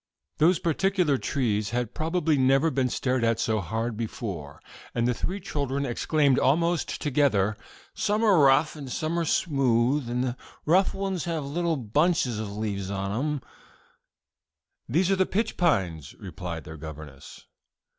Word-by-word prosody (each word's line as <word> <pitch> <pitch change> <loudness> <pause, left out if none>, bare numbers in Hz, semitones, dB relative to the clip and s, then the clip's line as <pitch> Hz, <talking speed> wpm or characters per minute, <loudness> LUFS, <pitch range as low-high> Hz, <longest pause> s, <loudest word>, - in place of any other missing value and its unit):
Those 170 +3 +5
particular 170 -4 +1
trees 110 -7 -1
had 120 -1 -2
probably 160 -1 0
never 135 +4 +3
been 130 -1 +1
stared 125 0 0
at 115 -1 +2
so 110 -1 +1
hard 110 +5 -3
before, 100 -9 -5 0.4
and 120 0 +1
the 125 - +2
three 190 +11 -3
children 140 -5 -2
exclaimed 140 +2 +2
almost 170 +4 +1
together: 125 -8 +2 0.4
"Some 210 +2 0
are 200 -6 +5
rough, 140 +3 +4
and 140 -4 -8
some 160 +5 -1
are 170 - 0
smooth, 135 -4 +1
and 125 +1 0
the 125 -1 -2 0.3
rough 185 +5 +3
ones 195 -3 -2
have 165 -4 -2
little 165 +3 -1
bunches 130 0 +1
of 110 -2 -4
leaves 100 -3 -3
on 100 0 -3
'em." 145 +6 -1 1.5
"These 175 +9 +2
are - - +4
the 190 0 +2
pitch 220 +4 -1
pines," 90 - 0
replied 85 -3 -7
their 80 +2 -9
governess. 75 -3 -10
135 Hz, 150 wpm, -26 LUFS, 110-165 Hz, 1.5 s, Those